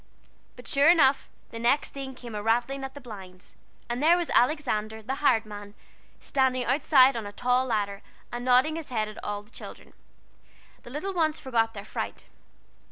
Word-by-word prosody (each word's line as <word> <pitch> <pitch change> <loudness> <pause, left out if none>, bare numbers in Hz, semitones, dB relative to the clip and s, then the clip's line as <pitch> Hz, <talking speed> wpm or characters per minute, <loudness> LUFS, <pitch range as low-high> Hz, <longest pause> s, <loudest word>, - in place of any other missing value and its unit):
And 245 - -12
sure 280 +3 +4
enough, 285 -6 +4 0.2
the 230 - -7
next 245 +5 +2
thing 270 -1 -6
came 240 -2 -10
a 210 - -3
rattling 240 +5 0
at 270 0 -6
the - - -7
blinds, 190 -7 -12 0.3
and 240 +2 -3
there 335 +3 +5
was 345 -2 -2
Alexander, 220 -6 +1
the 255 +5 -3
hired 225 -6 +3
man, 205 -1 -10 0.4
standing 260 -2 +1
outside 270 0 +5
on 225 -3 -4
a - - -7
tall 250 +4 +1
ladder 205 -3 -1 0.3
and 240 0 -5
nodding 255 +5 +3
his 325 - -7
head 220 -4 -1
at 215 - -9
the 205 +1 -5
children. - - -11 0.9
The - - -12
little 310 +10 -4
ones 315 -3 +1
forgot 225 -4 0
their 200 0 -7
fright. - - -5
245 Hz, 175 wpm, -27 LUFS, 215-275 Hz, 0.9 s, there